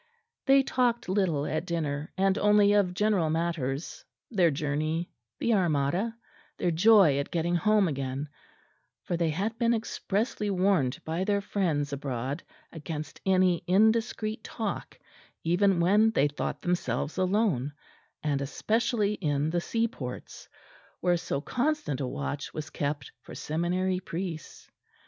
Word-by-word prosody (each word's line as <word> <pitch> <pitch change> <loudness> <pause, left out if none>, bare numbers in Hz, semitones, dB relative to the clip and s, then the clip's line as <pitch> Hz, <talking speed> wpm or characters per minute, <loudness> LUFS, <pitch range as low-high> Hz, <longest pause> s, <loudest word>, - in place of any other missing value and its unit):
They 270 0 +6
talked 245 -5 0
little 180 -7 +1
at 155 +1 -1
dinner; 150 -4 -2
and 195 0 +3
only 205 0 +5
of 190 -3 +2
general 205 -5 +2
matters, 160 -3 -2 0.3
their 185 -6 +4
journey, 155 +3 -2 0.3
the 235 - +1
Armada, 175 +4 +1 0.4
their 175 - +1
joy 180 -4 +6
at 140 - -3
getting 170 0 -1
home 210 +3 +3
again; 135 -1 -3 0.8
for 175 - -2
they 170 -1 +1
had 205 +8 -2
been 235 0 +3
expressly 215 -1 -2
warned 185 -9 +2
by 165 +3 -1
their 200 0 +1
friends 160 -8 -1
abroad 135 +1 -3 0.3
against 155 -1 -6
any 185 -2 +3
indiscreet 220 +2 +2
talk 220 -4 -4 0.5
even 180 +2 +3
when 205 +6 +4
they 145 -10 +2
thought 145 +7 -4
themselves 165 - -1
alone, 185 - +1 0.5
and 145 -2 0
especially 215 - 0
in 150 -5 -1
the 175 0 0
seaports, 220 - -4 0.5
where 175 -1 +2
so 165 -5 -2
constant 250 - -1
a 130 - -1
watch 70 - -4
was 155 0 -5
kept 145 0 -3
for - - -11
seminary 180 +4 -1
priests. 175 -2 -6
175 Hz, 130 wpm, -28 LUFS, 150-205 Hz, 0.8 s, They